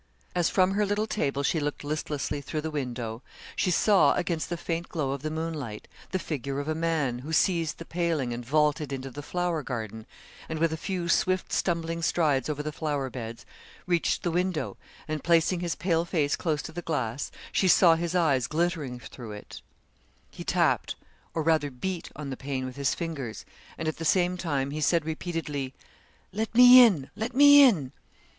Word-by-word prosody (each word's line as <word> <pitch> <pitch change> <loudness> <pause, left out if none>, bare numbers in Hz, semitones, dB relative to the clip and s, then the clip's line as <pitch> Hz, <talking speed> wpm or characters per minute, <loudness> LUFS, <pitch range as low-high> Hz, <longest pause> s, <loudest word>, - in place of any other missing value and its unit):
As 175 -2 +2
from 185 0 +3
her 205 +2 +1
little 205 +1 0
table 140 -10 -1
she 160 - +1
looked 145 0 -3
listlessly 145 -1 -3
through 155 +2 -4
the 160 +1 -4
window, 120 -5 -4 0.3
she - - +1
saw 195 +2 +4
against 170 -3 -2
the 175 - -2
faint 170 +1 -3
glow 150 -6 -2
of 140 -1 -4
the 155 - -3
moonlight, 155 -8 -5 0.2
the 190 - -1
figure 140 -5 -4
of 145 - -4
a 155 - 0
man 155 -6 -1
who 145 +5 -7
seized 165 -1 +1
the 165 - -8
paling 165 -8 -1
and 120 +1 -5
vaulted 150 +2 +1
into 135 0 -5
the 145 - -7
flower 175 +1 -1
garden, 110 -4 -6 0.4
and 160 - -3
with 165 0 +1
a - - -1
few 175 +1 -3
swift, 185 +2 +1
stumbling 165 -1 -1
strides 155 -5 +1
over 150 -1 -2
the 155 - -3
flower 145 -3 -2
beds, 115 -2 -7 0.4
reached 175 -2 +1
the 175 - 0
window, 180 -1 -1 0.3
and 155 -2 -3
placing 170 +1 +3
his 170 -2 -2
pale 170 -2 +1
face 155 -5 0
close 155 -3 -1
to - - -7
the 175 +2 -5
glass, 140 -6 -2 0.2
she 190 - +2
saw 170 -1 +7
his 170 +1 -2
eyes 140 -8 +2
glittering 155 -4 -1
through 120 -3 -9
it; 105 - -10 0.7
he - - -8
tapped - - +1 0.4
or 160 - 0
rather 155 -2 +2
beat 170 +7 -4
on 145 -2 -6
the - - -3
pane 135 -1 -4
with 130 - -7
his 140 -1 0
fingers 145 -10 -5 0.3
and 160 - -3
at 155 - -2
the 165 - -5
same 180 +2 +2
time 140 -6 -2
he 155 +1 -4
said, 165 +1 +2
repeatedly: 155 -5 -4 0.6
'Let 220 +2 -3
me 250 +1 +10
in; 165 - +2
let 225 +4 -4
me 285 +1 +9
in.' 175 - +4
160 Hz, 190 wpm, -27 LUFS, 140-175 Hz, 0.7 s, me